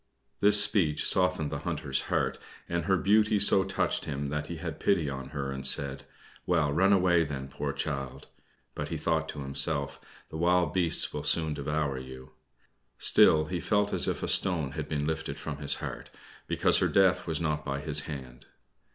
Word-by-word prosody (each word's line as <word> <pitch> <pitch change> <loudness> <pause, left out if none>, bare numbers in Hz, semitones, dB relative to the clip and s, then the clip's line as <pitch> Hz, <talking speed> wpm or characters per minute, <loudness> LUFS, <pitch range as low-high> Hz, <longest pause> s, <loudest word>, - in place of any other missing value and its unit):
This 105 0 +5
speech 85 -9 0
softened 90 -5 +1
the 70 - -4
Hunter's 75 -4 -2
heart, - - -1 0.3
and 85 -1 -2
her 95 +1 +2
beauty 105 +4 +3
so 100 -1 +7
touched 95 +1 -1
him 70 0 -4
that 75 +1 -4
he 85 - -6
had 80 -2 -6
pity 85 -8 +1
on 65 -1 -7
her 70 -2 -4
and 65 0 -6
said, 65 0 -1 0.4
"Well, 80 -5 +1
run 95 +6 +3
away 90 -3 +3
then, 70 -3 -6
poor - - -4
child." 70 -4 -5 0.5
But - - -5
he - - -4
thought 80 -1 -1
to 75 - -6
himself, 70 +1 -2 0.3
"The 80 - -7
wild 90 -1 +1
beasts 90 -3 +1
will 75 - -4
soon 80 +1 +1
devour 70 -1 -2
you." 65 0 -11 0.7
Still 75 0 +5
he 90 +3 -4
felt 105 +2 0
as - - +2
if - - -3
a - - -2
stone 80 -7 +2
had - - -6
been 75 -1 -2
lifted 80 0 -3
from 75 -3 -6
his 70 -1 +4
heart, - - -7 0.4
because - - +2
her - - +2
death 95 -2 +2
was 80 -3 -2
not 75 -2 -2
by 70 -1 -3
his - - 0
hand. 65 -5 -9
75 Hz, 185 wpm, -28 LUFS, 70-90 Hz, 0.7 s, so